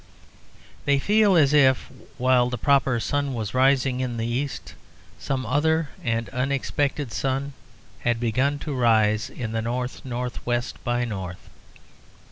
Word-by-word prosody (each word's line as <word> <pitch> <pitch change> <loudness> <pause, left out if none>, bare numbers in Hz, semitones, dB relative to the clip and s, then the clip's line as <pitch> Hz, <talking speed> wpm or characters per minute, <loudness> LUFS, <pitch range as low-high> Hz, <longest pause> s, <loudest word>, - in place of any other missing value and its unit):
They 140 0 +3
feel 205 +6 +3
as 145 -4 +4
if, 135 -3 +4 0.3
while 125 -1 +3
the 125 - -3
proper 135 -4 +2
sun 140 +3 -1
was 110 -3 -4
rising 130 0 +3
in 125 -2 -2
the 115 - -2
east, 130 +4 -3 0.5
some 130 -2 -2
other 155 +5 +1
and 115 -1 -1
unexpected 140 +1 -1
sun 135 +3 -2 0.5
had 120 -1 0
begun 130 +5 +1
to 150 - -3
rise 110 -2 +2
in 115 -5 -5
the 115 0 -1
north 125 +2 -3
north 125 -1 -4
west 120 0 -2
by 120 0 0
north. 95 -6 -7
125 Hz, 140 wpm, -24 LUFS, 120-140 Hz, 0.5 s, as